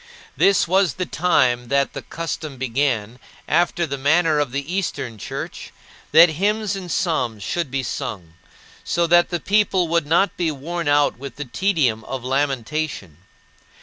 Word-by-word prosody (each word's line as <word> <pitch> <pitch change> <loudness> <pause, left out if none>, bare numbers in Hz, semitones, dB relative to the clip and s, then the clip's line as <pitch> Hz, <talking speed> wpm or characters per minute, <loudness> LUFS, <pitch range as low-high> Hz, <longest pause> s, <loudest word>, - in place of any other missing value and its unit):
This 195 -3 +3
was 190 -3 +2
the 185 - -2
time 130 -7 +1
that 140 +2 +1
the - - -5
custom 155 -3 -5
began, 125 -3 -1 0.3
after 175 0 +1
the 140 -3 -5
manner 155 +2 +3
of 145 -4 -1
the 140 +6 -4
Eastern 130 - -3
Church, - - -6 0.4
that 165 +3 +8
hymns 210 0 +1
and 185 -3 -6
psalms 120 - -1
should 170 - -2
be 135 0 -2
sung, 90 -7 -5 0.5
so 170 0 +1
that 175 +1 +4
the 175 - -2
people 195 -2 +2
would 170 -2 +1
not 175 +4 +2
be 170 -2 0
worn 160 +3 -4
out 145 -3 +2
with 140 +1 -8
the 145 - -6
tedium 135 - 0
of 130 -2 -5
lamentation. 135 - -2
150 Hz, 155 wpm, -21 LUFS, 130-175 Hz, 0.5 s, that